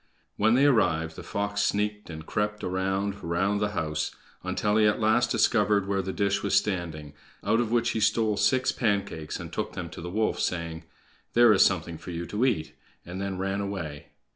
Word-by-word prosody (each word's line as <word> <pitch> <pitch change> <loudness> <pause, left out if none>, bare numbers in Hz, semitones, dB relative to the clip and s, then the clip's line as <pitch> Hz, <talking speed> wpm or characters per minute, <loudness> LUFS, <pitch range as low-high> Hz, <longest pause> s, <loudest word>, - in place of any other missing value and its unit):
When 110 +3 +3
they 135 +3 +4
arrived, 80 - +2
the - - -8
fox 100 0 -2
sneaked 105 0 -1
and 80 -1 -8
crept 105 +2 -2
around 95 +2 -2
round 95 +5 0
the 105 0 0
house, 75 -2 -1 0.3
until 105 0 0
he 110 -1 +5
at 105 - +1
last 115 +2 +3
discovered 105 -3 +2
where 100 -1 0
the 95 0 -4
dish 100 0 0
was 100 - 0
standing, 80 -7 -1 0.3
out 115 - +2
of 120 -2 0
which 120 0 +2
he - - -1
stole 110 0 +2
six 130 +5 +2
pancakes, 100 - -2
and - - -8
took - - -3
them - - -6
to - - -8
the 90 - -5
wolf, 110 +4 0
saying, 85 -2 -3 0.5
"There 120 -2 +7
is 95 - +6
something 85 -3 0
for 85 - -10
you 85 0 -4
to 105 +7 0
eat!" 90 -11 -1 0.3
and 90 +2 -6
then 100 -1 -3
ran 95 +1 -1
away. 85 -8 -5
100 Hz, 195 wpm, -27 LUFS, 85-105 Hz, 0.5 s, There